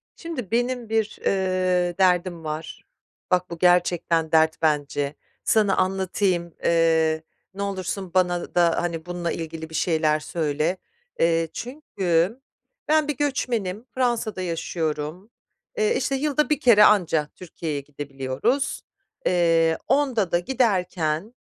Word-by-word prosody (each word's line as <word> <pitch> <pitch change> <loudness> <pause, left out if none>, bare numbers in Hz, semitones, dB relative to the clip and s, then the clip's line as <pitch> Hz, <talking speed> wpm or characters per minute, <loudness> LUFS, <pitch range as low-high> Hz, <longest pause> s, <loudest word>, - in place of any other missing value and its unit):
Şimdi 255 - -6
benim 245 0 -1
bir, 220 -1 0
eee, 185 -2 +1
derdim 180 -2 +2
var. 155 +1 -6 0.5
Bak, 180 0 +2
bu 170 - -6
gerçekten 175 -2 +2
dert 160 0 +3
bence. 145 -2 0 0.3
Sana 210 -3 +3
anlatayım, 185 -2 0
eee, 160 -1 +2 0.3
ne 200 - -6
olursun 190 -2 -4
bana 180 -2 0
da, 170 -2 +3
hani, 170 -2 -3
bununla 175 -1 -3
ilgili 160 -1 -6
bir 160 - -8
şeyler 155 -3 +2
söyle, 155 +2 -1 0.4
eee, 165 0 +2
çünkü 210 - -1 0.5
ben 310 -1 +3
bir 295 - -2
göçmenim. 235 -8 -1
Fransa'da 240 -6 0
yaşıyorum. 165 +1 -3 0.5
Eee, 445 +1 +2
işte 275 - -1
yılda 300 +2 0
1 300 - +1
kere 225 -4 +6
anca 170 -8 +4
Türkiye'ye 160 -4 -5
gidebiliyoruz. 140 - -2 0.4
Eee, 165 -2 +3
onda 250 -10 +1
da 175 - +3
giderken 185 -5 0
180 Hz, 120 wpm, -24 LUFS, 165-215 Hz, 0.5 s, kere